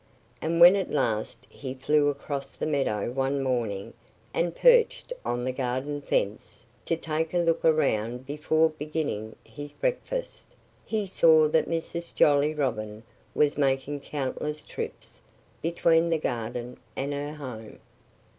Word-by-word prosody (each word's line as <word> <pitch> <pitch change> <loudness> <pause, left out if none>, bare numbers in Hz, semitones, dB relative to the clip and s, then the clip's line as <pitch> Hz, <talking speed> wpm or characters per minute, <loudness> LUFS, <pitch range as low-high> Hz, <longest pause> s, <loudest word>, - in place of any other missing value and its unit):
And 165 +1 0
when 175 +3 +10
at 195 -2 -1
last 115 -2 -1
he 130 -2 -7
flew 145 +2 +2
across 140 -1 -4
the - - -4
meadow 135 -8 0
one 135 +1 0
morning 115 -7 -2 0.4
and 170 0 0
perched - - +4
on 120 0 -2
the 130 - 0
garden 130 +3 -2
fence, 105 -6 -2 0.2
to 165 - 0
take 160 +1 -2
a - - +4
look 165 -1 +1
around 125 -6 +1
before 155 +3 +2
beginning 150 -8 -4
his 145 0 -9
breakfast, - - -3 0.3
he 215 -2 -1
saw 160 -4 +5
that 160 - +2
Mrs. 170 +1 -4
Jolly 145 +1 +4
Robin 110 -6 -2 0.3
was 150 0 +2
making 135 +1 +1
countless 150 +2 -4
trips - - -7 0.4
between 165 0 +3
the 165 - +2
garden 120 -2 -4 0.2
and 140 +2 -2
her 145 +1 -4
home. 120 -7 -8
145 Hz, 135 wpm, -27 LUFS, 130-160 Hz, 0.4 s, when